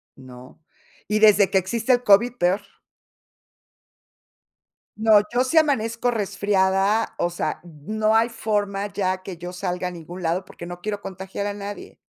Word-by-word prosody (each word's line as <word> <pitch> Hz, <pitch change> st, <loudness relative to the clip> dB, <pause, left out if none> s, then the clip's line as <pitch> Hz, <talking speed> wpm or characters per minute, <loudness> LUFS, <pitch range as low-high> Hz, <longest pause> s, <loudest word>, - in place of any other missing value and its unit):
¿no?, 130 Hz, +2 st, -14 dB, 0.5 s
y 210 Hz, 0 st, +1 dB
desde 210 Hz, -2 st, +6 dB
que -, -, +2 dB
existe 225 Hz, +7 st, -1 dB
el 245 Hz, 0 st, +1 dB
COVID 230 Hz, +4 st, +5 dB
peor. 185 Hz, +2 st, +1 dB, 2.4 s
No, 220 Hz, -1 st, +5 dB
yo 245 Hz, +1 st, +2 dB
si 260 Hz, +6 st, -2 dB
amanezco 245 Hz, -6 st, +1 dB
resfriada, 200 Hz, -1 st, +1 dB
o 175 Hz, -, 0 dB
sea, 175 Hz, -, -3 dB
no 215 Hz, +7 st, -1 dB
hay 225 Hz, +1 st, +3 dB
forma 205 Hz, -3 st, -2 dB
ya 185 Hz, -1 st, -1 dB
que 185 Hz, -1 st, -7 dB
yo 175 Hz, +1 st, -7 dB
salga 180 Hz, 0 st, -3 dB
a -, -, -6 dB
ningún 175 Hz, +1 st, -9 dB
lado, 170 Hz, +3 st, -1 dB
porque 175 Hz, -, -11 dB
no 175 Hz, 0 st, -8 dB
quiero 205 Hz, +2 st, -4 dB
contagiar 190 Hz, +1 st, -6 dB
a 205 Hz, -, -3 dB
nadie. 205 Hz, 0 st, -8 dB
200 Hz, 155 wpm, -23 LUFS, 180-220 Hz, 2.4 s, desde